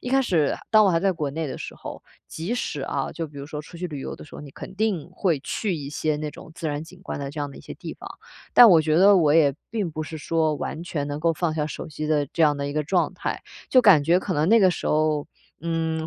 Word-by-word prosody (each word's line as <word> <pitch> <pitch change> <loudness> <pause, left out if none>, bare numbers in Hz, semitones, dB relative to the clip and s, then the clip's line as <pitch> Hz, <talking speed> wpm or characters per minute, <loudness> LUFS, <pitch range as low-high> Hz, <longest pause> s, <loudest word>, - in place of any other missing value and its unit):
一 - - -6
开 270 - +4
始 165 - +2 0.2
当 215 -1 +6
我 195 - +4
还 165 - +2
在 195 +2 +2
国 155 -5 -3
内 160 +2 -3
的 - - -5
时 - - -7
候， - - -9 0.2
即 165 +8 -5
使 165 - -3
啊， 135 0 -3
就 165 - -4
比 145 -1 -11
如 140 - -7
说 150 -1 -6
出 165 +3 -13
去 180 +2 -4
旅 150 -5 -6
游 - - -6
的 - - -11
时 - - -15
候， - - -8
你 145 - -10
肯 185 - -10
定 195 -6 -1
会 180 -5 0
去 195 +6 -2
一 140 -2 -6
些 155 0 -1
那 150 0 -4
种 - - -13
自 165 - -4
然 145 0 -2
景 180 +3 -13
观 145 - -5
的 140 -1 -4
这 150 - -9
样 145 - -2
的 - - -13
一 - - -11
些 - - -9
地 - - -8
方， - - -10 0.5
但 245 - +10
我 165 -3 +7
觉 155 0 +1
得 195 +3 +7
我 155 -4 +3
也 145 -4 +4 0.2
并 210 -7 -2
不 155 +1 -4
是 160 +1 -7
说 160 0 0
完 155 +2 -5
全 155 -4 -3
能 145 +1 -4
够 165 +1 +2
放 160 0 -1
下 150 -1 -1
手 - - -6
机 155 0 -5
的 150 -2 +2
这 165 - +1
样 150 -2 +4
的 140 0 -3
一 145 - -4
个 150 +1 0
状 175 +2 +1
态。 - - -4 0.3
就 255 - +6
感 190 -10 +7
觉 170 +4 +4
可 185 - -3
能 150 +2 +1
那 230 +3 +6
个 190 -4 +5
时 - - -4
候， 155 -1 +1 0.4
嗯， 160 -1 -1
160 Hz, 310 characters per minute, -24 LUFS, 150-180 Hz, 0.5 s, 但